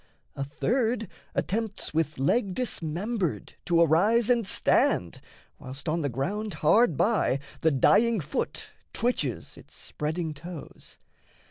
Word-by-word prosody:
A 140 Hz, -, -3 dB
third 225 Hz, -, -1 dB, 0.3 s
attempts 215 Hz, -2 st, -2 dB
With 155 Hz, -1 st, 0 dB
leg 185 Hz, -, +1 dB
dismembered 190 Hz, -, -2 dB
to 170 Hz, -1 st, +3 dB
arise 205 Hz, -, +4 dB
and 235 Hz, -5 st, +2 dB
stand, 90 Hz, -, +2 dB, 0.4 s
Whilst, 130 Hz, +4 st, -9 dB
on 165 Hz, +2 st, 0 dB
the 140 Hz, -, -1 dB
ground 195 Hz, -, -3 dB
hard 160 Hz, -, +3 dB
by, 205 Hz, -, +2 dB, 0.2 s
the 160 Hz, -, +3 dB
dying 215 Hz, -, +4 dB
foot 150 Hz, 0 st, -4 dB, 0.2 s
Twitches 185 Hz, -, -2 dB
its -, -, -15 dB
spreading 160 Hz, +1 st, -3 dB
toes. 165 Hz, +1 st, -10 dB
175 Hz, 120 wpm, -27 LUFS, 150-225 Hz, 0.4 s, arise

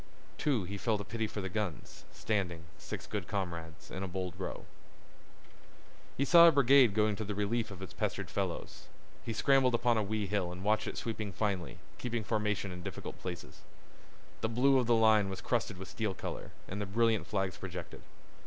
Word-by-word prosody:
Too, 135 Hz, -9 st, +2 dB
he 100 Hz, +3 st, -5 dB
felt 110 Hz, -1 st, +1 dB
a -, -, -3 dB
pity 110 Hz, +3 st, -2 dB
for 105 Hz, -, -5 dB
the 95 Hz, -, -3 dB
guns, 105 Hz, -5 st, -4 dB
standing, 90 Hz, -6 st, -2 dB, 0.2 s
six -, -, -6 dB
good 100 Hz, -5 st, -4 dB
comrades, 85 Hz, -4 st, -4 dB
in 95 Hz, -, -5 dB
a 95 Hz, -, -2 dB
bold 90 Hz, -1 st, -3 dB
row. 95 Hz, -, -5 dB, 1.5 s
He 140 Hz, -, +2 dB
saw 170 Hz, +2 st, +9 dB
a -, -, +8 dB
brigade 135 Hz, -5 st, +6 dB
going 105 Hz, -1 st, +3 dB
to 110 Hz, -, -2 dB
the 105 Hz, 0 st, -4 dB
relief 110 Hz, +3 st, 0 dB
of 95 Hz, -2 st, -8 dB
its 90 Hz, -1 st, -8 dB
pestered -, -, -2 dB
fellows. -, -, -3 dB, 0.4 s
He -, -, -3 dB
scrambled 130 Hz, +2 st, +4 dB
upon 120 Hz, -1 st, +3 dB
a -, -, +1 dB
wee 105 Hz, +1 st, -1 dB
hill 95 Hz, -3 st, -1 dB
and 90 Hz, +1 st, -7 dB
watched 110 Hz, +1 st, +2 dB
it -, -, -4 dB
sweeping 110 Hz, -3 st, -3 dB
finely, 95 Hz, -3 st, -2 dB, 0.2 s
keeping 120 Hz, -2 st, -2 dB
formation 105 Hz, -2 st, -1 dB
in 90 Hz, 0 st, -7 dB
difficult -, -, -6 dB
places. 90 Hz, -2 st, -7 dB, 0.8 s
The 110 Hz, -, 0 dB
blue 130 Hz, +4 st, +4 dB
of 125 Hz, -, 0 dB
the 120 Hz, -, +5 dB
line 110 Hz, -3 st, +5 dB
was 95 Hz, -1 st, -5 dB
crusted 115 Hz, -5 st, -1 dB
with 95 Hz, 0 st, -8 dB
steel 105 Hz, 0 st, -2 dB
color, -, -, -5 dB, 0.2 s
and 100 Hz, +2 st, -4 dB
the 105 Hz, -, -3 dB
brilliant 115 Hz, +1 st, +2 dB
flags 95 Hz, -3 st, -1 dB
projected. 90 Hz, -2 st, -7 dB
105 Hz, 190 wpm, -32 LUFS, 95-115 Hz, 1.5 s, saw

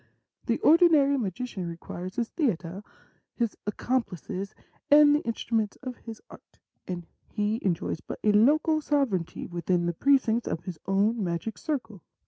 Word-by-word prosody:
The -, -, +2 dB
ordinary 310 Hz, -4 st, +5 dB
magician 205 Hz, -3 st, -4 dB
requires 175 Hz, +2 st, -7 dB
his 235 Hz, -2 st, -1 dB
theatre, 195 Hz, -, -2 dB, 0.5 s
his 235 Hz, -3 st, -1 dB
accom 250 Hz, +4 st, 0 dB
plices,, 190 Hz, +1 st, -7 dB, 0.3 s
and 290 Hz, 0 st, +7 dB
the -, -, +2 dB
instruments 225 Hz, -2 st, -1 dB
of 255 Hz, -2 st, -5 dB
his 225 Hz, -2 st, -9 dB
art, -, -, -16 dB, 0.3 s
and 175 Hz, -2 st, -5 dB, 0.2 s
he 210 Hz, +1 st, -1 dB
enjoys 170 Hz, -3 st, -1 dB
but -, -, -7 dB
a 210 Hz, -, +4 dB
local 305 Hz, +9 st, +4 dB
sovereignty 250 Hz, -, -1 dB
within 175 Hz, 0 st, -1 dB
the 175 Hz, -, 0 dB
precincts 240 Hz, -, +2 dB
of 165 Hz, -, -3 dB
his 175 Hz, -3 st, -7 dB
own 205 Hz, +3 st, +2 dB
magic 175 Hz, +5 st, -3 dB
circle. 240 Hz, -, -4 dB
215 Hz, 145 wpm, -27 LUFS, 180-260 Hz, 0.5 s, and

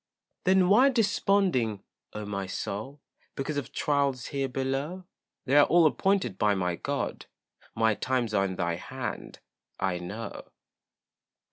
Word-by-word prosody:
Then 185 Hz, 0 st, +5 dB
why 240 Hz, +8 st, +6 dB
desponding, 195 Hz, -, +1 dB, 0.3 s
oh 105 Hz, 0 st, -5 dB
my 100 Hz, -2 st, -3 dB
soul, 120 Hz, +10 st, -5 dB, 0.3 s
Because 145 Hz, +2 st, -3 dB
of 135 Hz, -2 st, -4 dB
trials 140 Hz, -4 st, 0 dB
here 135 Hz, -1 st, 0 dB
below? 135 Hz, +7 st, -3 dB, 0.4 s
They're 145 Hz, +2 st, +6 dB
all 170 Hz, -1 st, +5 dB
appointed 190 Hz, -, +1 dB
by 105 Hz, -1 st, +3 dB
my 90 Hz, -2 st, -1 dB
God, -, -, -3 dB, 0.5 s
My 110 Hz, 0 st, +3 dB
times 125 Hz, -1 st, -1 dB
are 100 Hz, -1 st, +3 dB
in 95 Hz, -1 st, -3 dB
thy 85 Hz, -1 st, -1 dB
hand, -, -, -6 dB, 0.4 s
I 95 Hz, -2 st, 0 dB
know. 105 Hz, +6 st, -7 dB
130 Hz, 130 wpm, -28 LUFS, 105-155 Hz, 0.5 s, why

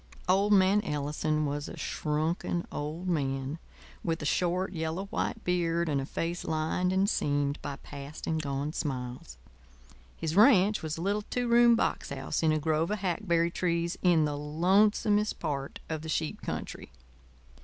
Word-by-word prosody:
Old 195 Hz, +3 st, +3 dB
man 195 Hz, +1 st, +5 dB
Ellison 150 Hz, -1 st, -1 dB
was 145 Hz, 0 st, -3 dB
a -, -, -9 dB
shrunken 160 Hz, +3 st, -1 dB
old 155 Hz, +5 st, -4 dB
man, 135 Hz, -2 st, -1 dB, 0.4 s
with 165 Hz, -1 st, -1 dB
a -, -, -3 dB
short, 180 Hz, +4 st, 0 dB
yellow 160 Hz, +3 st, -3 dB
white 225 Hz, -, -2 dB
beard 170 Hz, -1 st, +1 dB
and 140 Hz, -3 st, +1 dB
a 135 Hz, -, -5 dB
face 170 Hz, +3 st, -3 dB
lined 160 Hz, +3 st, 0 dB
and 190 Hz, +1 st, +2 dB
seamed 145 Hz, -6 st, 0 dB
by 140 Hz, -, -4 dB
past 140 Hz, +2 st, -9 dB
and 160 Hz, -1 st, 0 dB
gone 140 Hz, +1 st, -3 dB
smiles. 125 Hz, -, -4 dB, 0.8 s
His 160 Hz, 0 st, -2 dB
ranch 210 Hz, -2 st, +6 dB
was 155 Hz, 0 st, -4 dB
a 165 Hz, -, -4 dB
little 205 Hz, +2 st, +1 dB
two 245 Hz, -1 st, -1 dB
room 235 Hz, 0 st, +6 dB
box -, -, -1 dB
house -, -, -3 dB
in 160 Hz, -1 st, +3 dB
a 155 Hz, -, +2 dB
grove 155 Hz, +1 st, 0 dB
of 210 Hz, -, 0 dB
hackberry 170 Hz, -3 st, 0 dB
trees 170 Hz, -1 st, 0 dB
in 170 Hz, -4 st, +4 dB
the 145 Hz, -1 st, -2 dB
lonesomest 200 Hz, +8 st, +2 dB
part 140 Hz, -4 st, -3 dB
of 160 Hz, -1 st, -3 dB
the 160 Hz, -, -7 dB
sheep 155 Hz, 0 st, -2 dB
country. -, -, -5 dB
165 Hz, 165 wpm, -29 LUFS, 150-185 Hz, 0.8 s, ranch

